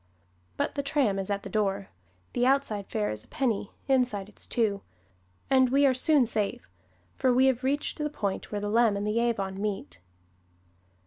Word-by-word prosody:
But -, -, -1 dB
the 285 Hz, -, -1 dB
tram 275 Hz, -8 st, +1 dB
is 195 Hz, -, -3 dB
at 200 Hz, -1 st, -1 dB
the -, -, -6 dB
door 195 Hz, -1 st, -1 dB, 0.4 s
the 245 Hz, -, 0 dB
outside 250 Hz, -7 st, +1 dB
fare 105 Hz, 0 st, -1 dB
is 105 Hz, 0 st, -6 dB
a -, -, -22 dB
penny, 230 Hz, -7 st, -1 dB, 0.2 s
inside 245 Hz, -7 st, +1 dB
it's 210 Hz, -, -8 dB
two 210 Hz, -4 st, 0 dB, 0.7 s
and 260 Hz, -1 st, +4 dB
we 280 Hz, +2 st, +4 dB
are 265 Hz, -, +5 dB
soon 275 Hz, +1 st, +4 dB
safe, 210 Hz, -, -2 dB, 0.5 s
for 255 Hz, -, +3 dB
we 255 Hz, +2 st, +4 dB
have 260 Hz, -1 st, +2 dB
reached 285 Hz, +4 st, -1 dB
the 300 Hz, 0 st, -1 dB
point 200 Hz, -9 st, -3 dB
where 205 Hz, -1 st, -2 dB
the 205 Hz, -, -2 dB
Leam 220 Hz, -1 st, +3 dB
and 200 Hz, -, -2 dB
the 210 Hz, +2 st, +1 dB
Avon 195 Hz, -5 st, -1 dB
meet. 195 Hz, -, -4 dB
220 Hz, 185 wpm, -28 LUFS, 200-260 Hz, 0.7 s, are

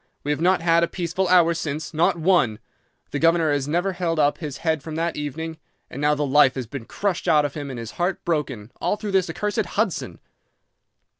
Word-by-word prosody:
We 145 Hz, -, -1 dB
have 150 Hz, -, -1 dB
not 180 Hz, +1 st, +3 dB
had 170 Hz, 0 st, +3 dB
a -, -, +2 dB
peaceful 180 Hz, +2 st, -2 dB
hour 175 Hz, -2 st, +5 dB
since—not 160 Hz, +1 st, -1 dB
one. 165 Hz, -, +2 dB, 0.5 s
The 145 Hz, -, -2 dB
governor 165 Hz, -1 st, +3 dB
has 140 Hz, -1 st, -1 dB
never 175 Hz, +5 st, 0 dB
held 175 Hz, -2 st, -1 dB
up 145 Hz, -1 st, +2 dB
his 150 Hz, -5 st, -5 dB
head 160 Hz, -2 st, +1 dB
from 155 Hz, +2 st, -7 dB
that 165 Hz, +1 st, -1 dB
evening, 155 Hz, +2 st, -5 dB, 0.3 s
and 140 Hz, -, -6 dB
now 150 Hz, 0 st, +3 dB
the 145 Hz, 0 st, -1 dB
life 135 Hz, -1 st, +5 dB
has 130 Hz, -2 st, -3 dB
been 120 Hz, 0 st, -7 dB
crushed 195 Hz, -, -2 dB
out 150 Hz, -3 st, +4 dB
of 145 Hz, -, -3 dB
him 145 Hz, -2 st, -5 dB
and 130 Hz, -, -6 dB
his 115 Hz, -1 st, -6 dB
heart 180 Hz, +1 st, -1 dB
broken, 135 Hz, -9 st, -2 dB
all -, -, +1 dB
through 210 Hz, -1 st, -5 dB
this 190 Hz, -1 st, +2 dB
accursed 210 Hz, +2 st, -2 dB
Hudson. 200 Hz, 0 st, -2 dB
160 Hz, 210 wpm, -23 LUFS, 145-175 Hz, 0.5 s, hour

